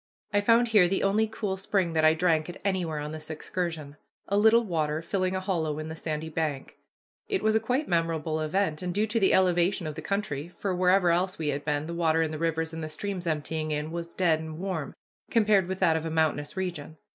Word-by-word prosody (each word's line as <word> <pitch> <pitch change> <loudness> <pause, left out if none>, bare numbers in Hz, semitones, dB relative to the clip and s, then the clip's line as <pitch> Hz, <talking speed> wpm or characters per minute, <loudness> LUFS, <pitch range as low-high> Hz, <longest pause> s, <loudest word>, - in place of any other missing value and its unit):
I 205 - +3
found 230 +3 +4
here 205 -5 +6
the 190 +2 0
only 210 +3 +2
cool 210 -3 -3
spring 190 -3 0
that 160 -1 +2
I 155 0 +6
drank 160 -1 +1
at 175 - -7
anywhere 180 -5 0
on 150 0 -4
this 155 0 -7
excursion, 155 -2 -4 0.3
a 200 - 0
little 220 +3 +5
water 160 -5 -1
filling 185 +1 -1
a - - 0
hollow 165 -6 -1
in 155 0 -5
the 160 - -5
sandy 160 -1 -4
bank. 155 -4 -3 0.5
It 400 -2 -1
was 220 - +3
a - - +5
quite 250 +7 -1
memorable 165 -2 0
event, 155 0 0
and 180 -1 -3
due 210 +1 +2
to 225 +2 0
the 195 - +3
elevation 180 -1 +2
of 155 - -3
the 160 - -7
country, 165 -5 -2
for 185 +2 -4
wherever 180 0 +3
else 185 +2 +1
we 155 -2 -2
had 145 0 -2
been 150 0 -1
the 170 - -5
water 165 -1 +2
in 160 - -2
the 155 - -5
rivers 160 0 -1
and 165 0 -5
the 155 - -4
streams 180 +2 -4
emptying 155 0 -2
in 150 +1 -2
was 170 0 -5
dead 165 -4 +2
and 160 -1 -7
warm, 180 -5 -4 0.3
compared 210 -5 +3
with 190 0 -3
that 165 -4 +4
of 160 - -1
a 165 - -3
mountainous 155 -1 0
region. 170 -4 -4
170 Hz, 230 wpm, -27 LUFS, 155-190 Hz, 0.5 s, here